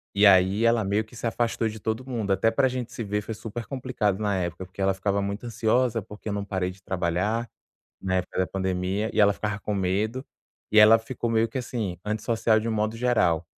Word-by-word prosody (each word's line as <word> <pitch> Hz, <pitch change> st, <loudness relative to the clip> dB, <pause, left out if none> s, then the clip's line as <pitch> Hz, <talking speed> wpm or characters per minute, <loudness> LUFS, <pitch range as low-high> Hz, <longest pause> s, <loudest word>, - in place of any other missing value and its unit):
e 100 Hz, +1 st, +5 dB
aí 95 Hz, +2 st, +5 dB
ela 115 Hz, -1 st, +3 dB
meio 100 Hz, +3 st, +1 dB
que 110 Hz, -, -17 dB
se -, -, -6 dB
afastou 115 Hz, 0 st, 0 dB
de 110 Hz, +1 st, -8 dB
todo 110 Hz, +4 st, -2 dB
mundo. 110 Hz, -6 st, -2 dB
Até 95 Hz, +4 st, +3 dB
pra 130 Hz, +4 st, +3 dB
gente 125 Hz, -2 st, -4 dB
se 115 Hz, -, -4 dB
ver, 105 Hz, 0 st, -1 dB
foi 110 Hz, -, -6 dB
super 110 Hz, +2 st, -6 dB
complicado 125 Hz, -7 st, -1 dB
na 105 Hz, -2 st, 0 dB
época, 85 Hz, 0 st, -3 dB
porque 95 Hz, +2 st, -9 dB
ela 95 Hz, 0 st, +3 dB
ficava 100 Hz, +1 st, -1 dB
muito 100 Hz, +4 st, -4 dB
ansiosa, 115 Hz, +1 st, +1 dB
porque 105 Hz, +2 st, -9 dB
eu -, -, -2 dB
não 100 Hz, 0 st, -2 dB
parei 95 Hz, -2 st, -2 dB
de 95 Hz, -, -17 dB
trabalhar 95 Hz, +5 st, -1 dB, 0.6 s
na 95 Hz, -1 st, -1 dB
época 90 Hz, 0 st, -3 dB
da 95 Hz, -, +2 dB
pandemia, 95 Hz, +3 st, -1 dB
e -, -, -4 dB
ela 100 Hz, -1 st, +6 dB
ficava 105 Hz, 0 st, -3 dB
com 105 Hz, -, -3 dB
medo. 100 Hz, +7 st, -1 dB, 0.5 s
E 110 Hz, -, +5 dB
ela 110 Hz, +1 st, +9 dB
ficou 120 Hz, +1 st, -4 dB
meio 115 Hz, 0 st, +2 dB
que 135 Hz, -, -4 dB
assim, 110 Hz, -8 st, -4 dB
antissocial 110 Hz, +1 st, +1 dB
de 115 Hz, -, -3 dB
um -, -, 0 dB
modo 110 Hz, +1 st, -1 dB
geral. 110 Hz, -9 st, +2 dB
105 Hz, 225 wpm, -26 LUFS, 95-115 Hz, 0.6 s, ela